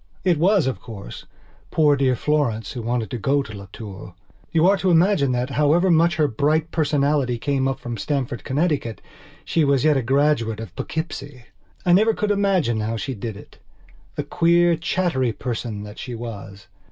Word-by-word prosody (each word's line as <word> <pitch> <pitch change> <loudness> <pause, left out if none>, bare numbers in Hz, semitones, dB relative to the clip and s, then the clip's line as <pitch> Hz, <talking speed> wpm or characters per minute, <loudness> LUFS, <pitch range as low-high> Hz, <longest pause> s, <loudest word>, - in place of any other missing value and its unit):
It 175 -5 +2
was, 190 +1 +3
of 130 - -2
course, 100 - -9 0.4
poor 150 -2 +3
dear 135 -2 +2
Florence 120 -6 0
who 125 - -5
wanted 115 -2 -2
to 120 - -3
go 140 +6 +1
to 110 - -10
Las 100 -1 -9
Tours. 100 -3 -9 0.4
You 165 0 +3
are 195 +2 +5
to 190 - 0
imagine 170 -5 +3
that, 125 +2 -1
however 150 +7 +3
much 170 +1 +4
her 155 -2 +2
bright 155 +6 0
personality 145 -5 +1
came 135 +1 0
from 120 -1 -6
Stamford, 130 -4 -2
Connecticut, 145 -5 -1 0.5
she 165 - +1
was 140 -1 +2
yet 150 -2 +4
a - - +1
graduate 130 -3 +1
of 110 -4 -8
Poughkeepsie. 145 -5 -5 0.4
I 175 - +4
never 215 +4 +4
could 210 0 0
imagine 190 - +1
how 110 +2 -2
she 135 +4 -4
did 110 -1 -6 0.8
itthe - - -3
queer, 170 0 +4
chattery 160 -7 0
person 115 -3 -4
that 105 0 -10
she 125 -2 -6
was. 100 -4 -8
140 Hz, 175 wpm, -22 LUFS, 115-160 Hz, 0.8 s, are